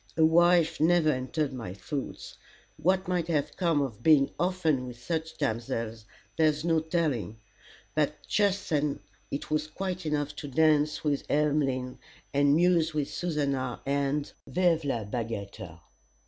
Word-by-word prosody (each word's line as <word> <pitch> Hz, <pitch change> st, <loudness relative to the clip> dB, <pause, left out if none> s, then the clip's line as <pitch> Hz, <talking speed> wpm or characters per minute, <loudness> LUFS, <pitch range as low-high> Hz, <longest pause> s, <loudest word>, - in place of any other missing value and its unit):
A 160 Hz, -, +6 dB
wife 170 Hz, 0 st, +4 dB
never 165 Hz, 0 st, +4 dB
entered 130 Hz, +2 st, -2 dB
my 110 Hz, -8 st, -6 dB
thoughts. 135 Hz, +6 st, -6 dB, 0.4 s
What 185 Hz, +4 st, +1 dB
might 180 Hz, -2 st, 0 dB
have 150 Hz, -4 st, -1 dB
come 165 Hz, -6 st, +2 dB
of 120 Hz, -5 st, -6 dB
being 145 Hz, -1 st, +5 dB
often 165 Hz, -8 st, +1 dB
with 120 Hz, -1 st, -9 dB
such 160 Hz, +4 st, -3 dB
damsels, 115 Hz, -4 st, -3 dB, 0.3 s
there's 155 Hz, -1 st, +2 dB
no 165 Hz, -1 st, +3 dB
telling; 155 Hz, -, -1 dB, 0.6 s
but -, -, +1 dB
just 200 Hz, -1 st, +1 dB
then 145 Hz, -4 st, 0 dB, 0.3 s
it 140 Hz, -, -5 dB
was 155 Hz, 0 st, 0 dB
quite 185 Hz, +1 st, -4 dB
enough 150 Hz, -1 st, -1 dB
to 145 Hz, -, -6 dB
dance 150 Hz, +1 st, +2 dB
with 145 Hz, -2 st, 0 dB
Emmeline, 140 Hz, -4 st, 0 dB, 0.3 s
and 140 Hz, +1 st, +4 dB
muse 165 Hz, -2 st, +3 dB
with 145 Hz, -2 st, -1 dB
Susannah, 140 Hz, -7 st, -2 dB
and 140 Hz, +1 st, -1 dB
vive 175 Hz, -3 st, +2 dB
la 120 Hz, -5 st, -1 dB
bagatelle! 100 Hz, -6 st, -5 dB
150 Hz, 140 wpm, -28 LUFS, 130-165 Hz, 0.6 s, A